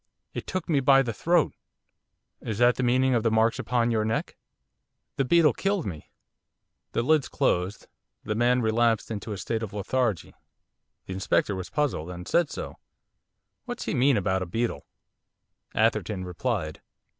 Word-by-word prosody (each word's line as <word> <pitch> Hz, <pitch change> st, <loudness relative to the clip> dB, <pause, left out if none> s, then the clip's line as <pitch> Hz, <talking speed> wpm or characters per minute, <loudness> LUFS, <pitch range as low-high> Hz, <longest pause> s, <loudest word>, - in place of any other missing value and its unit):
'It -, -, -6 dB
took 185 Hz, -3 st, -3 dB
me 150 Hz, -4 st, +2 dB
by 135 Hz, 0 st, +5 dB
the 115 Hz, -3 st, -3 dB
throat!' 170 Hz, +8 st, +2 dB, 0.9 s
'Is 110 Hz, -3 st, -4 dB
that 120 Hz, +1 st, +5 dB
the -, -, -2 dB
meaning 130 Hz, +1 st, +3 dB
of 120 Hz, -, +2 dB
the 115 Hz, -, +2 dB
marks 110 Hz, +1 st, +2 dB
upon 120 Hz, -1 st, +1 dB
your 110 Hz, -2 st, +1 dB
neck?' 110 Hz, +1 st, -2 dB, 0.8 s
'The 135 Hz, -, +1 dB
beetle 165 Hz, +2 st, +5 dB
killed 195 Hz, -2 st, -1 dB
me.' 80 Hz, -6 st, -7 dB, 0.8 s
The 115 Hz, -, +1 dB
lids 150 Hz, +1 st, +2 dB
closed. 95 Hz, -8 st, 0 dB, 0.4 s
The 105 Hz, -, -2 dB
man 120 Hz, +2 st, +2 dB
relapsed 115 Hz, 0 st, +1 dB
into 110 Hz, 0 st, -5 dB
a 100 Hz, -, -4 dB
state 110 Hz, +3 st, -2 dB
of 110 Hz, -4 st, -5 dB
lethargy. 105 Hz, -, -1 dB, 0.7 s
The 95 Hz, -, -6 dB
Inspector 95 Hz, +2 st, +1 dB
was 95 Hz, -1 st, -6 dB
puzzled; 140 Hz, -, -1 dB
and 90 Hz, 0 st, -8 dB
said 170 Hz, -3 st, +2 dB
so. -, -, -7 dB, 0.9 s
'What's 245 Hz, -1 st, -5 dB
he -, -, -2 dB
mean 135 Hz, -2 st, +3 dB
about 95 Hz, -1 st, 0 dB
a 90 Hz, -, -3 dB
beetle?' 115 Hz, +6 st, -2 dB, 0.9 s
Atherton 95 Hz, -4 st, +1 dB
replied. 90 Hz, -, -3 dB
115 Hz, 160 wpm, -26 LUFS, 100-135 Hz, 0.9 s, by